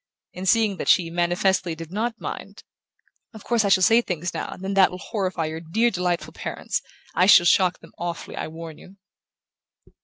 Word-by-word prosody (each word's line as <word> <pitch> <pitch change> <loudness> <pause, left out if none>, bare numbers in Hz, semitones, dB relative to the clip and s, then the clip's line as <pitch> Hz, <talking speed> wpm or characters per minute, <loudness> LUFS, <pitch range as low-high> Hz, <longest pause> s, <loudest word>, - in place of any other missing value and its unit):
and, 185 +1 -2
seeing 220 -3 +3
that - - -5
she 165 -2 +4
manifestly 175 0 +1
did 165 0 -9
not 225 +3 -2
mind: - - -7 0.7
"Of 220 - -11
course 235 -2 +1
I 200 - +1
shall 190 -1 +4
say 225 +4 +5
things 175 -4 -4
now - - -4
and 185 - -9
then 195 +1 -2
that 195 -2 +5
will 180 - -7
horrify 185 -4 -3
your 160 +1 -4
dear 220 +9 +1
delightful 180 -2 -2
parents - - -4 0.3
I 180 - +3
shall 175 -3 +8
shock 180 0 +4
them - - -16
awfully, 170 0 -5
I - - -4
warn 160 0 -9
you." 190 - -15
180 Hz, 190 wpm, -23 LUFS, 170-200 Hz, 0.7 s, shall